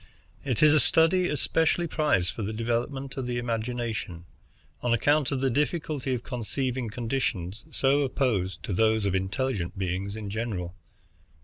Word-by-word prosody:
It 130 -1 0
is 150 0 +7
a 155 - +6
study 180 +4 +4
especially 160 +3 +1
prized 150 - +1
for 110 - -6
the 105 +1 -3
development 120 +5 -2
of 130 -2 -3
the 120 0 -2
imagination, 115 -6 -3 0.6
on 120 -1 +2
account 145 +4 +2
of 135 -2 -1
the 135 -1 +2
difficulty 150 0 -1
of 120 - -6
conceiving 125 0 -3
conditions 115 -4 -2
so 140 -1 +2
opposed 125 -9 0
to 100 - -3
those 110 +2 +2
of 100 - +1
intelligent 95 0 -1
beings 95 +2 -2
in 105 -2 -5
general. 100 -6 -3
120 Hz, 150 wpm, -27 LUFS, 105-135 Hz, 0.6 s, is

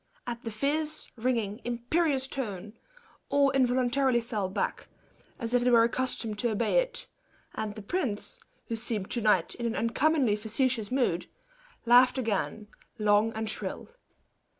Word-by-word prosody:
At 240 0 -5
the 230 - -3
fierce, 300 +7 -1
ringing, 230 -3 -1
imperious 265 +4 0
tone, 215 -7 -5 0.6
all 280 -1 +4
involuntarily 255 0 +2
fell 220 -5 -3
back, 190 - -2 0.5
as 235 -1 -3
if 245 -1 +3
they 250 - +3
were 235 -2 +6
accustomed 235 -3 -2
to 240 - +1
obey 225 - +2
it; - - -3 0.5
and 210 -1 -4
the 215 - -8
prince, 270 - -3 0.3
who 230 - -3
seemed 220 -3 -3
to 240 - -1
night 210 -1 +3
in 235 - -3
an 230 - -2
uncommonly 255 0 +2
facetious 225 +1 -1
mood, 245 -10 +1 0.6
laughed 250 +2 +6
again, 215 -2 -2 0.3
long 210 +1 +3
and 220 0 -3
shrill. 215 - -5
235 Hz, 145 wpm, -29 LUFS, 215-260 Hz, 0.6 s, were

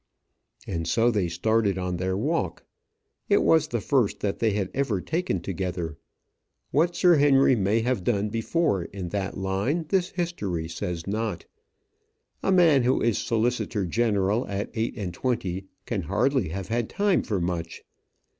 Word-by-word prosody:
And 85 -3 -3
so 115 +7 +3
they 100 -6 0
started 100 +3 +1
on 90 -1 -2
their 95 +1 -1
walk. - - -1 0.6
It - - +4
was 160 -1 +4
the 120 - -2
first 125 -2 +1
that 100 -1 -1
they 115 - +2
had 100 -2 -2
ever 125 -8 0
taken 160 - -2
together. 90 -3 -3 0.8
What 165 +5 +2
Sir 175 -3 +5
Henry 135 -2 +5
may 105 +1 +1
have 125 -4 -1
done 105 0 0
before 115 - 0
in 95 -3 -6
that 100 0 -3
line 100 - -1
this 185 -2 +1
history 105 - -3
says 85 +1 -4
not. 105 -3 -3 1.0
A - - +1
man 170 -7 +5
who 125 +2 +2
is 115 -2 +1
solicitor 115 -3 0
general 105 +2 +1
at 100 0 -3
eight 115 +2 -2
and 95 -5 -4
twenty 95 -4 -2 0.2
can 110 -5 -2
hardly 100 - +1
have 95 +4 -5
had 115 0 -1
time 200 -2 +2
for 105 -5 -2
much. 85 -1 -3
105 Hz, 155 wpm, -26 LUFS, 95-125 Hz, 1.0 s, Sir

